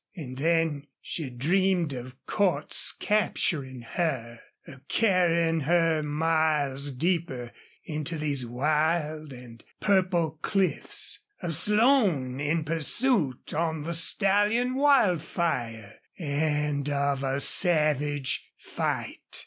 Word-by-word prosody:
And 130 Hz, -8 st, -8 dB
then 160 Hz, -2 st, 0 dB
she 155 Hz, -6 st, -4 dB
dreamed 170 Hz, +5 st, +1 dB
of 125 Hz, 0 st, -8 dB
Cordts 180 Hz, -8 st, 0 dB
capturing 150 Hz, -, -1 dB
her, 120 Hz, -4 st, -3 dB, 0.3 s
of 135 Hz, -3 st, -14 dB
carrying 170 Hz, -6 st, +2 dB
her 165 Hz, +1 st, +2 dB
miles 150 Hz, -2 st, 0 dB
deeper 140 Hz, -4 st, -2 dB, 0.3 s
into 155 Hz, +1 st, -4 dB
these 145 Hz, -4 st, -2 dB
wild 155 Hz, +4 st, -1 dB
and 125 Hz, -2 st, -12 dB, 0.2 s
purple 180 Hz, -6 st, +1 dB
cliffs, 195 Hz, -2 st, 0 dB, 0.2 s
of 170 Hz, -1 st, -1 dB
Slone 205 Hz, -, +3 dB
in 155 Hz, +3 st, 0 dB
pursuit 165 Hz, -, +1 dB
on 160 Hz, -1 st, -1 dB
the 170 Hz, +2 st, -3 dB
stallion 205 Hz, +8 st, +2 dB
Wildfire, 170 Hz, -, 0 dB, 0.2 s
and 150 Hz, -2 st, -1 dB
of 140 Hz, -1 st, 0 dB
a 135 Hz, 0 st, -1 dB
savage 150 Hz, -4 st, +1 dB
fight. -, -, -4 dB
155 Hz, 100 wpm, -27 LUFS, 140-175 Hz, 0.3 s, Slone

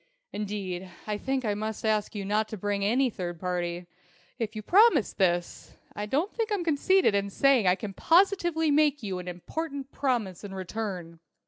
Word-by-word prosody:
Indeed, 195 Hz, -3 st, -4 dB, 0.2 s
I 210 Hz, -1 st, -3 dB
think 265 Hz, 0 st, -1 dB
I 210 Hz, -, +1 dB
must 215 Hz, +1 st, -4 dB
ask 215 Hz, -1 st, 0 dB
you 200 Hz, -1 st, -3 dB
not 210 Hz, +2 st, +1 dB
to 215 Hz, -, -6 dB
bring 205 Hz, +1 st, -1 dB
in 200 Hz, +2 st, +2 dB
any 255 Hz, +1 st, +2 dB
third 175 Hz, -4 st, -5 dB
party. 175 Hz, -1 st, -2 dB, 0.5 s
If 225 Hz, -1 st, -3 dB
you 215 Hz, -, -5 dB
promise 370 Hz, -, +5 dB
this, 175 Hz, -3 st, -1 dB, 0.2 s
I 210 Hz, 0 st, -4 dB
don't 305 Hz, -, 0 dB
think 455 Hz, -1 st, -2 dB
I'm 400 Hz, -4 st, 0 dB
conceited 335 Hz, -, +3 dB
in 200 Hz, 0 st, 0 dB
saying 255 Hz, -1 st, +3 dB
I 180 Hz, -, +5 dB
can 200 Hz, 0 st, -6 dB
positively 345 Hz, -, +3 dB
make 290 Hz, -3 st, +3 dB
you 190 Hz, -3 st, -3 dB
an 180 Hz, -, -8 dB
important 275 Hz, -, -5 dB
promise 235 Hz, -10 st, -1 dB
in 195 Hz, -1 st, -7 dB
return. 185 Hz, -4 st, -5 dB
215 Hz, 185 wpm, -28 LUFS, 190-280 Hz, 0.5 s, promise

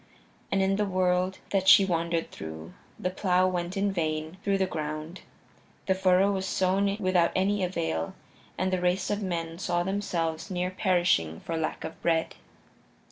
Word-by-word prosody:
And 195 Hz, 0 st, +2 dB
in 195 Hz, 0 st, +1 dB
the 210 Hz, -, +1 dB
world 185 Hz, -1 st, +1 dB
that 190 Hz, -1 st, +1 dB
she 195 Hz, -, +8 dB
wandered 170 Hz, -2 st, -1 dB
through, 80 Hz, +1 st, -8 dB, 0.2 s
the 180 Hz, -, -2 dB
plow 185 Hz, -1 st, +2 dB
went 180 Hz, +1 st, -2 dB
in 200 Hz, +1 st, +1 dB
vain 160 Hz, -1 st, -2 dB
through 200 Hz, -1 st, +2 dB
the 190 Hz, -, +2 dB
ground; 155 Hz, 0 st, -5 dB, 0.6 s
the 190 Hz, -, +3 dB
furrow 190 Hz, +1 st, +3 dB
was 190 Hz, -1 st, -2 dB
sown 195 Hz, +2 st, +1 dB
without 185 Hz, -4 st, +2 dB
any 195 Hz, +1 st, +1 dB
avail, 80 Hz, -, -2 dB, 0.4 s
and 185 Hz, +1 st, 0 dB
the 185 Hz, -, 0 dB
race 180 Hz, +2 st, +1 dB
of 205 Hz, +1 st, -1 dB
men 170 Hz, -3 st, -3 dB
saw 175 Hz, -2 st, 0 dB
themselves 175 Hz, -4 st, -2 dB
near 180 Hz, -1 st, -1 dB
perishing 175 Hz, -, +1 dB
for 165 Hz, -, -4 dB
lack 160 Hz, -1 st, -3 dB
of 160 Hz, -, -7 dB
bread. 165 Hz, -1 st, +1 dB
180 Hz, 165 wpm, -28 LUFS, 165-190 Hz, 0.6 s, she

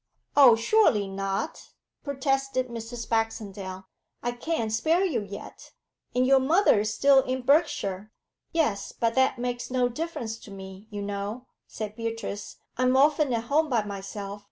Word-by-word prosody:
'Oh, 265 Hz, -5 st, +8 dB
surely 230 Hz, -, +3 dB
not!' 195 Hz, +7 st, -3 dB, 0.4 s
protested 270 Hz, -2 st, -1 dB
Mrs. 230 Hz, 0 st, -6 dB
Baxendale. 200 Hz, -4 st, -3 dB, 0.4 s
'I 240 Hz, -, 0 dB
can't 240 Hz, -2 st, -2 dB
spare 320 Hz, -, +2 dB
you 275 Hz, -, 0 dB
yet. 200 Hz, 0 st, -10 dB, 0.4 s
And 250 Hz, +1 st, +3 dB
your 270 Hz, +1 st, +5 dB
mother 310 Hz, -, +4 dB
is 215 Hz, +1 st, 0 dB
still 275 Hz, +5 st, +5 dB
in 260 Hz, 0 st, -3 dB
Berkshire.' 215 Hz, -, +1 dB, 0.4 s
'Yes, 230 Hz, -12 st, 0 dB
but 230 Hz, -1 st, +2 dB
that 260 Hz, 0 st, +3 dB
makes 245 Hz, 0 st, -3 dB
no 250 Hz, -1 st, +1 dB
difference 245 Hz, -6 st, -4 dB
to -, -, -13 dB
me, 190 Hz, +1 st, -10 dB
you 205 Hz, -2 st, -5 dB
know,' 205 Hz, +4 st, -4 dB, 0.2 s
said 215 Hz, -1 st, -6 dB
Beatrice. 225 Hz, -3 st, -5 dB, 0.2 s
'I'm 255 Hz, +1 st, +3 dB
often 290 Hz, 0 st, +4 dB
at 230 Hz, -1 st, 0 dB
home 300 Hz, +5 st, +1 dB
by 235 Hz, -5 st, +2 dB
myself. 200 Hz, 0 st, -6 dB
235 Hz, 150 wpm, -27 LUFS, 205-270 Hz, 0.4 s, Oh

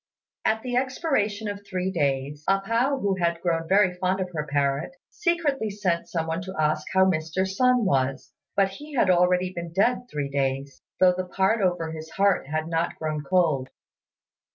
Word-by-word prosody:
At 220 Hz, 0 st, +1 dB
the 245 Hz, -1 st, -1 dB
expiration 250 Hz, -6 st, 0 dB
of 205 Hz, 0 st, -5 dB
three 185 Hz, -1 st, -2 dB
days, 145 Hz, -3 st, -1 dB
A 195 Hz, 0 st, +4 dB
pao, 235 Hz, +7 st, +1 dB
who 200 Hz, -6 st, 0 dB
had 170 Hz, -2 st, 0 dB
grown 165 Hz, -2 st, -1 dB
very 190 Hz, -1 st, +4 dB
fond 185 Hz, +1 st, -1 dB
of 185 Hz, -1 st, -3 dB
her 150 Hz, -2 st, -3 dB
parrot, 140 Hz, -, 0 dB, 0.2 s
secretly 330 Hz, -, 0 dB
sent 190 Hz, -4 st, -1 dB
some 165 Hz, -2 st, -1 dB
one 165 Hz, +2 st, -2 dB
to 190 Hz, +1 st, -7 dB
ask 155 Hz, 0 st, +1 dB
how 190 Hz, 0 st, +5 dB
Mr. 170 Hz, +1 st, 0 dB
Sun 250 Hz, +4 st, +2 dB
was; 135 Hz, -6 st, 0 dB, 0.2 s
but 195 Hz, -1 st, +3 dB
he 290 Hz, +9 st, -10 dB
had 195 Hz, -7 st, +4 dB
already 180 Hz, +1 st, +2 dB
been 170 Hz, -1 st, -6 dB
dead 240 Hz, +7 st, +1 dB
three 145 Hz, -2 st, -3 dB
days, 135 Hz, 0 st, -2 dB, 0.2 s
though 185 Hz, -1 st, +6 dB
the 185 Hz, 0 st, -3 dB
part 195 Hz, +4 st, +1 dB
over 175 Hz, -4 st, 0 dB
his 160 Hz, 0 st, -7 dB
heart 195 Hz, -5 st, +1 dB
had 155 Hz, +2 st, -2 dB
not 165 Hz, 0 st, -1 dB
grown 155 Hz, -1 st, -3 dB
cold. 155 Hz, -5 st, +1 dB
180 Hz, 180 wpm, -25 LUFS, 155-205 Hz, 0.2 s, though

